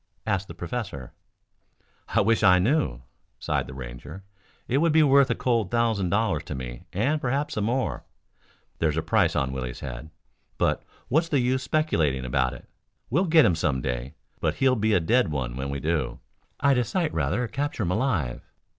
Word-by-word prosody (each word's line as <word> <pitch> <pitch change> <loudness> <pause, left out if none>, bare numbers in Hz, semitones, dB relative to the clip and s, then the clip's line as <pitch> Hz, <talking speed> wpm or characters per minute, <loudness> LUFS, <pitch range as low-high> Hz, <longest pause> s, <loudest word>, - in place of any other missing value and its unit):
asked 95 -3 -1
the 85 - -9
professor. 85 - -5 0.9
"I - - +2
wish 115 +2 +2
I 90 -3 +6
knew," 95 - +1 0.3
sighed - - -1
the 65 - -9
Ranger. 65 +8 -8 0.4
"It 130 +3 +2
would 165 +1 +3
be 160 0 +6
worth 140 -1 +5
a 115 - +1
cold 115 -6 0
thousand 115 -6 +1
dollars 100 -6 +1
to 75 - -5
me 60 -2 -7
and 140 - 0
perhaps 140 +3 -1
some 105 - -1
more. 125 +3 -1 0.8
There's 80 -1 +1
a 80 - 0
price - - +2
on 70 -2 0
Willie's 65 -2 -5
head. 65 +3 -7 0.5
But - - +1 0.3
what's 160 +5 +1
the 145 - +2
use 130 +1 +1
speculating 85 - 0
about 65 0 +1
it? - - -14 0.4
We'll 175 +9 +3
get 160 -3 +6
him 90 - +4
some 75 -5 0
day, 65 +3 -4 0.2
but - - 0
he'll 130 -1 +3
be 110 -1 +1
a - - +4
dead 115 +6 +2
one 65 -5 -3
when 65 +1 -4
we 70 0 -3
do. 75 -3 -1 0.4
I'd 140 -2 +3
a - - +2
sight 170 - -1
rather 85 - 0
capture 140 -2 -2
him 90 - -1
alive." 95 - 0
100 Hz, 185 wpm, -26 LUFS, -, 0.9 s, I